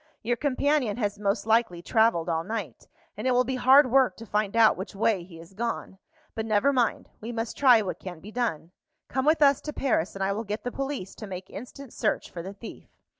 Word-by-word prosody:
"Your 240 +2 +1
companion 280 -3 0
has 205 -3 -2
most 200 +1 -1
likely 220 -6 +1
travelled 220 -7 +2
all 165 -1 0
night, 200 - -6 0.3
and 215 +5 -3
it 255 - +3
will 250 0 +4
be 260 +1 -3
hard 260 +1 +6
work 255 -8 +3
to 230 - -9
find 210 -1 -1
out 225 -1 +6
which 195 +2 -7
way 200 -2 +1
he 170 -1 -13
has 165 +3 -14
gone. 220 -3 -4 0.3
But 220 0 -4
never 215 +6 +3
mind; 245 -4 0
we 225 +3 -5
must 225 -1 -4
try 245 -6 +5
what 185 - -5
can 180 -3 -8
be 205 +6 -11
done. 180 -9 -2 0.4
Come 265 +1 -1
with 310 0 +4
us 280 -1 +4
to 300 - -6
Paris, 215 - 0
and 195 - -3
I 195 - +1
will 220 +3 -3
get 210 +1 -5
the 245 - -3
police 270 -9 -4
to 215 - -9
make 185 -1 -8
instant 260 +1 -10
search 215 - -1
for 170 - -6
the 190 +3 -7
thief. 225 +3 -11
220 Hz, 225 wpm, -27 LUFS, 195-250 Hz, 0.4 s, hard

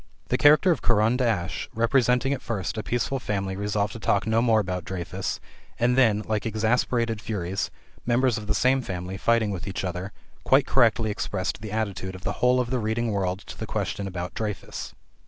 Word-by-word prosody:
The - - +2
caricature 155 +5 +6
by 155 - -5
Caran 115 +1 +4
d'Ache 110 -9 -1
representing 125 +3 +2
at 140 - -4
first 105 -5 -3
a 110 - -2
peaceful 120 +4 -1
family 100 -5 -2
resolved 105 +1 -1
to 115 - -7
talk 100 -1 +1
no 110 +1 +2
more 115 -2 +4
about 90 -3 -2
Dreyfus, 90 +1 -4 0.4
and 120 +1 +3
then, 110 -5 +4
like 110 -1 -1
exasperated 115 0 0
furies, 95 -3 -2 0.3
members 125 0 +2
of 105 - -9
the 105 - +1
same 130 +4 +3
family 90 -4 -5
fighting 115 0 +2
with 95 0 -5
each 95 - -3
other, 90 +1 -4 0.3
quite 135 +1 +4
correctly 115 -3 +3
expressed 100 0 -3
the 110 -2 -6
attitude 100 -4 -3
of 95 - -11
the - - -1
whole 125 0 +4
of 125 -1 -1
the 130 - +1
reading 110 +1 -1
world 95 -1 -1
to - - -10
the 110 - -6
question 100 -1 -2
about 90 -1 -5
Dreyfus. 105 -3 -5
110 Hz, 190 wpm, -25 LUFS, 95-120 Hz, 0.4 s, caricature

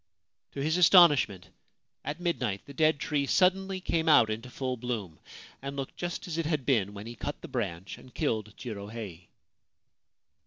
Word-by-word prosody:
To 140 - -3
his 160 +3 +1
astonishment, 160 - +6 0.6
at 145 +4 -4
midnight 125 - -2
the 140 - -11
dead 155 0 +3
tree 145 -2 -1
suddenly 190 +2 +2
came 165 -3 0
out 120 -7 +6
into 115 +4 -5
full 130 0 -3
bloom, 115 -9 -5 0.4
and 140 +1 -5
looked 135 -1 -5
just 175 0 -4
as 165 -1 -3
it 165 - -1
had 150 -5 -1
been 105 -7 +1
when 100 +1 -8
he 115 - -7
cut 145 +5 -5
the - - -6
branch 95 -7 -4
and 130 - -15
killed 110 -2 -2
Jirohei. 100 -6 -7
130 Hz, 165 wpm, -29 LUFS, 110-160 Hz, 0.6 s, astonishment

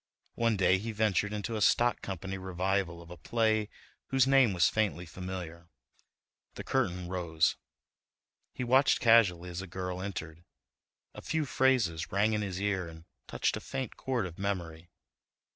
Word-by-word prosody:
One 115 -2 +1
day 95 0 +3
he 115 +3 -4
ventured 105 -1 +1
into 105 +2 -3
a 105 - -2
stock 120 +3 +3
company 95 0 -5
revival 95 -1 -2
of 85 - -15
a 90 - -9
play 110 +3 +1 0.4
whose 135 -1 +3
name 135 -4 +5
was 85 -3 +3
faintly 105 -5 0
familiar. 85 -1 -7 0.9
The - - -6
curtain 90 0 -1
rose—he 85 +7 -4
watched 130 +3 +4
casually 95 -7 +4
as 85 +1 -4
a 95 - -8
girl 90 0 -5
entered. 85 -4 -6 0.7
A - - -9
few 160 -1 -1
phrases 125 - +1
rang 105 +3 +2
in 105 - 0
his 95 -3 -4
ear 95 -3 -1
and 80 0 -12 0.2
touched - - 0
a - - -7
faint 130 -4 -5
chord 125 -6 -2
of 85 -1 -9
memory. 85 -4 -4
95 Hz, 155 wpm, -30 LUFS, 85-110 Hz, 0.9 s, name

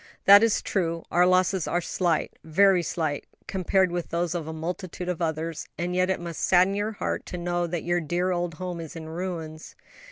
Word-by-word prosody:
"That 200 +1 +9
is 230 -1 +2
true; 170 -4 -1
our 180 +1 +4
losses 185 -1 +2
are 175 - +1
slight, 175 -2 -1
very 185 +3 +4
slight, 160 -4 -2 0.2
compared 190 -1 +1
with 175 -1 -3
those 170 0 -1
of 165 -3 -3
multitudes 175 +2 -4
of 175 - -6
others; 160 0 -2
and 175 +2 -2
yet 185 0 +2
it 190 - 0
must 170 -2 -6
sadden 185 +1 +4
your 205 +2 -2
heart - - -3
to 180 - -5
know 175 0 -1
that 170 -1 -3
your 175 0 +1
dear 175 +4 0
old 175 -2 -2
home 180 0 -5
is 165 -1 -8
in 160 -1 -7
ruins." 160 -2 -6
175 Hz, 195 wpm, -26 LUFS, 165-185 Hz, 0.2 s, That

